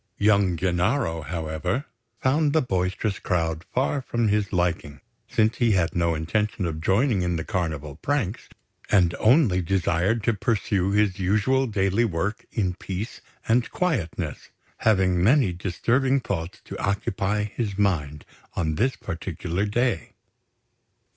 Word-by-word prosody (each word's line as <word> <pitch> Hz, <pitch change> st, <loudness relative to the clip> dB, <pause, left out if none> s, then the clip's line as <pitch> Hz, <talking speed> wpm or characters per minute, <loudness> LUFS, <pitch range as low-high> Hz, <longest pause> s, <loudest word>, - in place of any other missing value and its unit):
Young 100 Hz, -3 st, +3 dB
Gennaro, 90 Hz, -, 0 dB
however, 80 Hz, -, -3 dB, 0.4 s
found 145 Hz, +2 st, +2 dB
the 160 Hz, -, +4 dB
boisterous 95 Hz, -1 st, -1 dB
crowd 80 Hz, -2 st, -1 dB
far 135 Hz, +2 st, 0 dB
from 120 Hz, -3 st, 0 dB
his 105 Hz, -1 st, +1 dB
liking, 85 Hz, -6 st, -1 dB, 0.3 s
since 110 Hz, +1 st, +2 dB
he 120 Hz, -3 st, +3 dB
had 90 Hz, -2 st, +1 dB
no 85 Hz, -1 st, +1 dB
intention 100 Hz, +5 st, -1 dB
of 80 Hz, -2 st, -3 dB
joining 100 Hz, -, +2 dB
in 90 Hz, -1 st, 0 dB
the 80 Hz, -, -2 dB
Carnival 75 Hz, -6 st, -3 dB
pranks, 125 Hz, -8 st, -2 dB, 0.4 s
and 90 Hz, -5 st, +4 dB
only 110 Hz, -, +4 dB
desired 95 Hz, +4 st, +1 dB
to 115 Hz, -, +2 dB
pursue 100 Hz, -3 st, 0 dB
his 100 Hz, -2 st, +1 dB
usual 110 Hz, +8 st, +2 dB
daily 100 Hz, 0 st, +1 dB
work 100 Hz, +1 st, -2 dB
in 95 Hz, -5 st, 0 dB
peace 95 Hz, +5 st, -6 dB, 0.3 s
and 115 Hz, +1 st, +2 dB
quietness, 140 Hz, -, -2 dB, 0.3 s
having 95 Hz, -5 st, +2 dB
many 120 Hz, -3 st, +4 dB
disturbing 120 Hz, -, +1 dB
thoughts 90 Hz, -8 st, -4 dB
to -, -, -7 dB
occupy 100 Hz, +1 st, 0 dB
his 105 Hz, -1 st, -3 dB
mind 75 Hz, -8 st, 0 dB, 0.3 s
on 80 Hz, -4 st, 0 dB
this 125 Hz, +11 st, +1 dB
particular 90 Hz, +1 st, -3 dB
day. 120 Hz, +2 st, 0 dB
95 Hz, 135 wpm, -25 LUFS, 85-115 Hz, 0.4 s, the